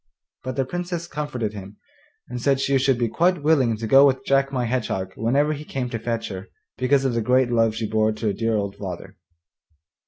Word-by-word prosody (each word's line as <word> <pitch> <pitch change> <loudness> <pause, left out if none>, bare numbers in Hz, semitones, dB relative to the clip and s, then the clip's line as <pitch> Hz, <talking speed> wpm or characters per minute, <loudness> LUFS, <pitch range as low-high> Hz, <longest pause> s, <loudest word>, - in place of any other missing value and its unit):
But 130 0 -4
the 135 - 0
Princess 175 +3 -4
comforted 145 -10 -4
him, 100 0 -9 0.5
and 125 0 -6
said 135 +1 +2
she 135 0 +2
should 135 -1 +2
be 120 -1 +1
quite 170 +6 +1
willing 135 -8 +3
to 115 - -5
go 135 +5 +7
with 130 -1 0
Jack 135 0 +2
my 125 -3 -1
Hedgehog 110 -6 -2
whenever 140 +7 +1
he 150 0 -7
came 130 -4 -4
to 115 - -3
fetch 115 0 -3
her, 95 -1 -7 0.3
because 135 +1 +2
of 130 - +1
the 115 - 0
great 125 +2 +2
love 115 -2 +2
she 110 0 -2
bore 110 0 +2
to 110 +1 -6
her 105 - +1
dear 115 +2 0
old 100 -2 -2
father. 90 -4 -7
125 Hz, 215 wpm, -23 LUFS, 110-135 Hz, 0.5 s, go